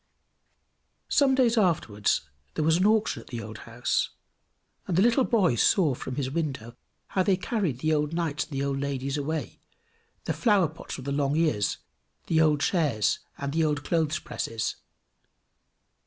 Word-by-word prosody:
Some 270 Hz, -2 st, +4 dB
days 240 Hz, -3 st, +3 dB
afterwards 110 Hz, -, +1 dB, 0.3 s
there 155 Hz, -, 0 dB
was 160 Hz, +1 st, +4 dB
an 185 Hz, +3 st, +3 dB
auction 215 Hz, 0 st, +2 dB
at -, -, -18 dB
the 120 Hz, -, -5 dB
old 110 Hz, +1 st, -8 dB
house, 120 Hz, +2 st, 0 dB, 0.8 s
and 175 Hz, -, 0 dB
the -, -, +5 dB
little 240 Hz, +3 st, +4 dB
boy 205 Hz, -, +3 dB
saw 150 Hz, -, +3 dB
from 125 Hz, +1 st, -6 dB
his 130 Hz, -1 st, -2 dB
window 135 Hz, -7 st, -3 dB, 0.3 s
how 190 Hz, -, +1 dB
they 185 Hz, 0 st, +2 dB
carried 180 Hz, -, -2 dB
the 155 Hz, 0 st, +2 dB
old 150 Hz, 0 st, 0 dB
knights 165 Hz, -3 st, -1 dB
and -, -, -24 dB
the 135 Hz, -1 st, -2 dB
old 140 Hz, -1 st, -1 dB
ladies 140 Hz, -1 st, -2 dB
away, 155 Hz, +2 st, -4 dB, 0.6 s
the -, -, -1 dB
flower 205 Hz, -, +3 dB
pots 160 Hz, -, -8 dB
with 130 Hz, -, -9 dB
the 140 Hz, -, -2 dB
long 140 Hz, 0 st, +1 dB
ears, 155 Hz, -11 st, +1 dB, 0.5 s
the 160 Hz, -1 st, +2 dB
old 150 Hz, -2 st, +3 dB
chairs, 145 Hz, -, +1 dB, 0.2 s
and 140 Hz, 0 st, -4 dB
the 165 Hz, 0 st, +2 dB
old 150 Hz, -2 st, 0 dB
clothes 160 Hz, -2 st, 0 dB
presses. 115 Hz, -1 st, -3 dB
155 Hz, 170 wpm, -27 LUFS, 135-180 Hz, 0.8 s, the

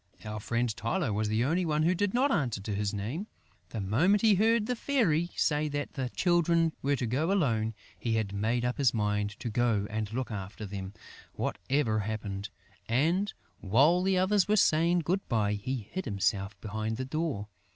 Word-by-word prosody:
Our 105 Hz, 0 st, -4 dB
friend 120 Hz, +3 st, 0 dB
Tylô 115 Hz, -, -1 dB
was 105 Hz, +1 st, 0 dB
the 110 Hz, +2 st, +1 dB
only 170 Hz, +6 st, +1 dB
one 155 Hz, -2 st, +1 dB
who 170 Hz, +3 st, +3 dB
did 195 Hz, +2 st, 0 dB
not 265 Hz, +5 st, +2 dB
answer 130 Hz, -, 0 dB
to 100 Hz, +2 st, -4 dB
his 100 Hz, 0 st, -1 dB
name. 115 Hz, -, -4 dB, 0.4 s
The 115 Hz, -, -5 dB
moment 155 Hz, -, +2 dB
he 220 Hz, -2 st, +6 dB
heard 220 Hz, +3 st, +3 dB
the 250 Hz, -, -1 dB
Fairy 190 Hz, -, +1 dB
say 150 Hz, 0 st, +1 dB
that 145 Hz, 0 st, -3 dB
the 130 Hz, -3 st, -3 dB
Children 170 Hz, 0 st, +2 dB
were 140 Hz, +1 st, +1 dB
to 125 Hz, -, -2 dB
go 140 Hz, -, 0 dB
alone, 115 Hz, -, +1 dB, 0.2 s
he 115 Hz, -2 st, -1 dB
had 105 Hz, -3 st, -1 dB
made 115 Hz, +4 st, 0 dB
up 125 Hz, +2 st, -2 dB
his 130 Hz, -4 st, +3 dB
mind 105 Hz, -1 st, -1 dB
to 120 Hz, -, -4 dB
go 115 Hz, -3 st, +1 dB
and 110 Hz, -1 st, -3 dB
look 125 Hz, +1 st, -3 dB
after 100 Hz, +1 st, -6 dB
them, 95 Hz, 0 st, -6 dB, 0.4 s
whatever 115 Hz, +1 st, 0 dB
happened; 100 Hz, -1 st, -4 dB, 0.4 s
and, 165 Hz, -, +2 dB, 0.3 s
while 140 Hz, -, +4 dB
the 190 Hz, 0 st, +2 dB
others 190 Hz, +1 st, +3 dB
were 210 Hz, -, +3 dB
saying 170 Hz, -2 st, +3 dB
good 185 Hz, +5 st, -1 dB
bye, 105 Hz, -3 st, +1 dB
he 110 Hz, +2 st, -4 dB
hid 185 Hz, -8 st, -3 dB, 0.5 s
behind 110 Hz, +1 st, -3 dB
the 130 Hz, -, -3 dB
door. 140 Hz, -7 st, -2 dB
125 Hz, 185 wpm, -30 LUFS, 110-175 Hz, 0.5 s, he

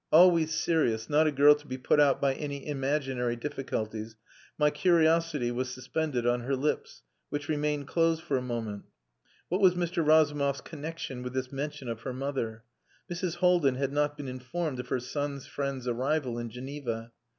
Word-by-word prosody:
Always 165 Hz, -2 st, +6 dB
serious, 135 Hz, -9 st, +1 dB
not 155 Hz, +2 st, +5 dB
a -, -, +2 dB
girl 145 Hz, +1 st, +7 dB
to 145 Hz, 0 st, -8 dB
be 130 Hz, -, -4 dB
put 130 Hz, +3 st, +2 dB
out 145 Hz, -2 st, +5 dB
by 140 Hz, -1 st, +2 dB
any 140 Hz, -1 st, -5 dB
imaginary 135 Hz, -4 st, -1 dB
difficulties, 115 Hz, -5 st, -4 dB, 0.4 s
my 150 Hz, -1 st, +4 dB
curiosity 165 Hz, -7 st, +3 dB
was 125 Hz, +1 st, -2 dB
suspended 130 Hz, 0 st, -2 dB
on 120 Hz, 0 st, +2 dB
her 130 Hz, +3 st, -1 dB
lips, 145 Hz, +3 st, -2 dB, 0.3 s
which 145 Hz, 0 st, -3 dB
remained 150 Hz, -2 st, -1 dB
closed 165 Hz, -1 st, +2 dB
for 140 Hz, -, -1 dB
a 130 Hz, -, +1 dB
moment. 115 Hz, -5 st, -4 dB, 0.6 s
What 185 Hz, +4 st, 0 dB
was 185 Hz, -2 st, +6 dB
Mr. 175 Hz, -1 st, 0 dB
Razumov's 145 Hz, -3 st, +3 dB
connexion 155 Hz, -4 st, -6 dB
with 125 Hz, 0 st, -5 dB
this 130 Hz, -1 st, -3 dB
mention 140 Hz, -1 st, -4 dB
of 115 Hz, -1 st, -4 dB
her 130 Hz, -, -4 dB
mother? 125 Hz, -4 st, -3 dB, 0.5 s
Mrs. 175 Hz, 0 st, -2 dB
Haldin 175 Hz, -7 st, +4 dB
had 135 Hz, +1 st, -1 dB
not 145 Hz, 0 st, +1 dB
been 145 Hz, -2 st, -6 dB
informed 130 Hz, +3 st, -3 dB
of 125 Hz, -, -5 dB
her 125 Hz, -, 0 dB
son's 140 Hz, +2 st, -4 dB
friend's 140 Hz, -3 st, -4 dB
arrival 125 Hz, 0 st, 0 dB
in 120 Hz, 0 st, -4 dB
Geneva. 125 Hz, -2 st, -5 dB
140 Hz, 175 wpm, -29 LUFS, 125-155 Hz, 0.6 s, girl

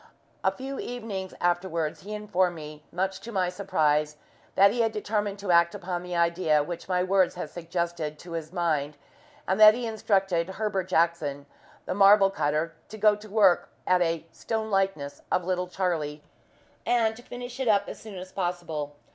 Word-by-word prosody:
A -, -, +3 dB
few 270 Hz, +1 st, -6 dB
evenings 215 Hz, -6 st, -5 dB
afterwards 175 Hz, -3 st, 0 dB
he 210 Hz, +3 st, -6 dB
informed 190 Hz, -4 st, 0 dB
me, 150 Hz, -1 st, -9 dB
much 190 Hz, +2 st, -2 dB
to 230 Hz, +3 st, -8 dB
my 185 Hz, -4 st, +1 dB
surprise, 155 Hz, -6 st, +1 dB, 0.4 s
that 200 Hz, +1 st, +6 dB
he 240 Hz, +2 st, 0 dB
had 225 Hz, -1 st, +2 dB
determined 210 Hz, -1 st, -2 dB
to 200 Hz, -2 st, -2 dB
act 170 Hz, 0 st, +4 dB
upon 175 Hz, -1 st, -4 dB
the 180 Hz, 0 st, -5 dB
idea 170 Hz, -3 st, +2 dB
which 170 Hz, +4 st, -7 dB
my 180 Hz, -1 st, +2 dB
words 190 Hz, 0 st, +2 dB
had 170 Hz, -4 st, -6 dB
suggested 170 Hz, -2 st, -3 dB
to 175 Hz, +3 st, -12 dB
his 165 Hz, -1 st, -5 dB
mind, 155 Hz, -5 st, -1 dB, 0.5 s
and 190 Hz, +2 st, +1 dB
that 215 Hz, 0 st, +9 dB
he 245 Hz, 0 st, -3 dB
had 225 Hz, -, -2 dB
instructed 190 Hz, -4 st, 0 dB
Heber 210 Hz, -3 st, 0 dB
Jackson, 165 Hz, -5 st, 0 dB, 0.4 s
the -, -, -2 dB
marble 195 Hz, 0 st, +6 dB
cutter, 155 Hz, 0 st, -1 dB, 0.2 s
to 215 Hz, -, -8 dB
go 210 Hz, 0 st, +5 dB
to 210 Hz, +1 st, -12 dB
work 200 Hz, -4 st, +4 dB, 0.2 s
at 180 Hz, 0 st, +3 dB
a 165 Hz, -1 st, 0 dB
"stone 220 Hz, -1 st, -3 dB
likeness" 190 Hz, -8 st, -1 dB
of 180 Hz, -, +1 dB
little 180 Hz, 0 st, -1 dB
Charlie, 165 Hz, -5 st, -2 dB, 0.6 s
and 225 Hz, -2 st, +2 dB
to 240 Hz, -, -12 dB
finish 245 Hz, +1 st, -8 dB
it 265 Hz, -, -1 dB
up 200 Hz, -2 st, +3 dB
as -, -, -7 dB
soon 215 Hz, -3 st, -9 dB
as 185 Hz, +1 st, -8 dB
possible. 170 Hz, -5 st, -3 dB
185 Hz, 180 wpm, -27 LUFS, 165-205 Hz, 0.6 s, that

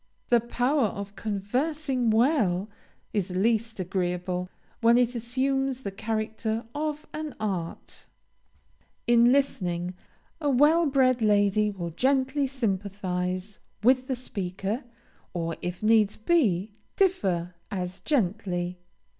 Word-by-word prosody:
The 240 Hz, -, +6 dB
power 245 Hz, +3 st, +1 dB
of 200 Hz, 0 st, -6 dB
conversing 250 Hz, +5 st, -1 dB
well 220 Hz, -, +2 dB, 0.4 s
is 200 Hz, -3 st, 0 dB
least 220 Hz, +4 st, 0 dB
agreeable 180 Hz, 0 st, -2 dB, 0.3 s
when 235 Hz, 0 st, +5 dB
it 245 Hz, 0 st, +3 dB
assumes 265 Hz, +2 st, -1 dB
the 200 Hz, -, -3 dB
character 220 Hz, +1 st, -2 dB
of 300 Hz, +1 st, -3 dB
an 305 Hz, -2 st, -5 dB
art. 190 Hz, -6 st, -4 dB, 1.0 s
In 240 Hz, 0 st, +5 dB
listening, 180 Hz, -10 st, 0 dB, 0.5 s
a 295 Hz, -, +1 dB
well 300 Hz, +5 st, +5 dB
bred 255 Hz, -3 st, +3 dB
lady 210 Hz, 0 st, +3 dB
will 175 Hz, -4 st, -5 dB
gently 265 Hz, -, +1 dB
sympathize 195 Hz, -5 st, -2 dB, 0.2 s
with 255 Hz, +2 st, +4 dB
the 260 Hz, -, 0 dB
speaker; 200 Hz, 0 st, -4 dB, 0.5 s
or, 165 Hz, -1 st, -2 dB
if 180 Hz, +3 st, -4 dB
needs 215 Hz, -2 st, +4 dB
must 215 Hz, -, -28 dB
be, 215 Hz, -, +2 dB, 0.2 s
differ, 190 Hz, -, +1 dB, 0.2 s
as 185 Hz, -2 st, -4 dB
gently. 180 Hz, -, -1 dB
220 Hz, 115 wpm, -27 LUFS, 185-260 Hz, 1.0 s, The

